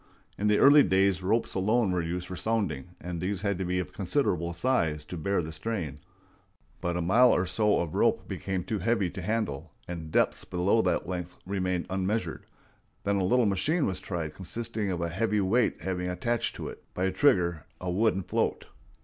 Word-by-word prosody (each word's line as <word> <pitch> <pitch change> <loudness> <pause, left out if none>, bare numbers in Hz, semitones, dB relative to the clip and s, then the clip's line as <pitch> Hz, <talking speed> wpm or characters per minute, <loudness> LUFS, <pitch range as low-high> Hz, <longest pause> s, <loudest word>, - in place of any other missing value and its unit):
In 105 - -1
the 105 0 +4
early 145 +2 +8
days 95 -4 +3
ropes 110 +5 +1
alone 105 +2 +2
were 90 -1 +1
used 85 +2 -3
for 90 - -6
sounding, 90 -6 -2
and 85 -2 -5
these 95 +1 -2
had 100 -3 0
to 95 - -1
be 90 +1 -1
of 90 - -3
considerable 85 +2 0
size 85 -7 0
to 90 - -7
bear 90 +2 0
the 80 - -6
strain; 85 -3 -4 0.8
but 85 0 -1
a 90 - -1
mile 120 +8 +5
or 90 - +2
so 105 +3 +2
of 85 -3 -2
rope - - +2
became 95 -2 -3
too 110 +2 -2
heavy 110 -6 +1
to 95 - -6
handle, 105 -8 -2
and 80 -3 -6
depths - - +2
below 95 +5 +2
that - - 0
length 90 -1 -5
remained 90 -2 -1
unmeasured. 95 -2 -2 0.6
Then 100 0 +1
a 95 - +1
little 120 +6 +3
machine 140 - +1
was 95 -2 -1
tried 85 -5 -4
consisting 110 +4 -4
of 90 -2 -2
a 85 - -1
heavy 105 +4 0
weight 105 +6 +1
having 90 -1 -2
attached 115 +6 -1
to - - -5
it, - - -9
by 90 - 0
a 95 - +1
trigger, 90 - +2
a 90 -1 -3
wooden 95 0 +2
float. - - -1
95 Hz, 195 wpm, -28 LUFS, 90-105 Hz, 0.8 s, early